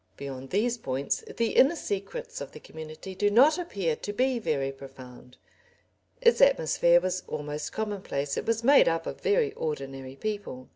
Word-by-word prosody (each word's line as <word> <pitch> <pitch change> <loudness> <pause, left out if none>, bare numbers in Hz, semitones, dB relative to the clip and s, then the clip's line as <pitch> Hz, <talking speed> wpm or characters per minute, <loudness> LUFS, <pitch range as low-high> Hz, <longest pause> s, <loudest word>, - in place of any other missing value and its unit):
Beyond 135 -1 -7
these 235 +5 0
points 135 -5 -2
the 230 -1 +1
inner 280 +6 +5
secrets 475 - -5
of - - -7
the - - -10
community 160 +4 -9
do 205 +2 +1
not 275 - +5
appear 195 - -2
to 205 - -5
be 255 +3 +1
very 140 -10 -1
profound; 130 -2 -13 0.8
its 475 -1 +4
atmosphere 175 - +5
was 185 0 -2
almost 150 0 -4
commonplace, 190 -10 -3
it - - -4
was 230 0 0
made 280 +3 +6
up 165 0 0
of - - -6
very 430 0 +2
ordinary 135 -3 -5
people. 200 -9 -5
185 Hz, 160 wpm, -28 LUFS, -, 0.8 s, made